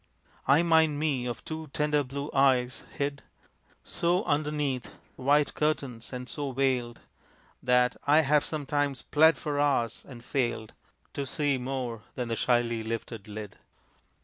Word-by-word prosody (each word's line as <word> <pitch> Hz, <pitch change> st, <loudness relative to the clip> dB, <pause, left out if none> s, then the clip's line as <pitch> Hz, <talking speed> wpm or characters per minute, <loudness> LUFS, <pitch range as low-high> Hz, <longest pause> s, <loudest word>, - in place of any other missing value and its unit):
(I 145 Hz, +5 st, +5 dB
mind 160 Hz, -3 st, +4 dB
me 140 Hz, -5 st, 0 dB
of 120 Hz, -, -5 dB
two 160 Hz, 0 st, -5 dB
tender 150 Hz, -1 st, +2 dB
blue 140 Hz, +3 st, -5 dB
eyes, 130 Hz, -2 st, +2 dB
hid 140 Hz, -1 st, -2 dB, 0.6 s
So 175 Hz, +3 st, +1 dB
underneath 145 Hz, -, -1 dB, 0.2 s
white 145 Hz, +3 st, +2 dB
curtains, 140 Hz, -6 st, -2 dB
and 125 Hz, -1 st, -6 dB
so 140 Hz, -2 st, -4 dB
veiled 125 Hz, -3 st, 0 dB, 0.6 s
That 125 Hz, 0 st, +3 dB
I 150 Hz, +2 st, +6 dB
have 150 Hz, 0 st, +3 dB
sometimes 145 Hz, -3 st, -2 dB
plead 160 Hz, +2 st, +5 dB
for 145 Hz, -3 st, -2 dB
hours, 135 Hz, -6 st, +1 dB
and 120 Hz, -3 st, -11 dB
failed 120 Hz, -5 st, -1 dB, 0.4 s
To 140 Hz, -1 st, -3 dB
see 145 Hz, -2 st, 0 dB
more 125 Hz, -3 st, -3 dB
than 125 Hz, -2 st, -3 dB
the 115 Hz, -, 0 dB
shyly 120 Hz, -1 st, +1 dB
lifted 115 Hz, -1 st, -5 dB
lid.) 105 Hz, -1 st, -8 dB
135 Hz, 140 wpm, -28 LUFS, 125-150 Hz, 0.6 s, I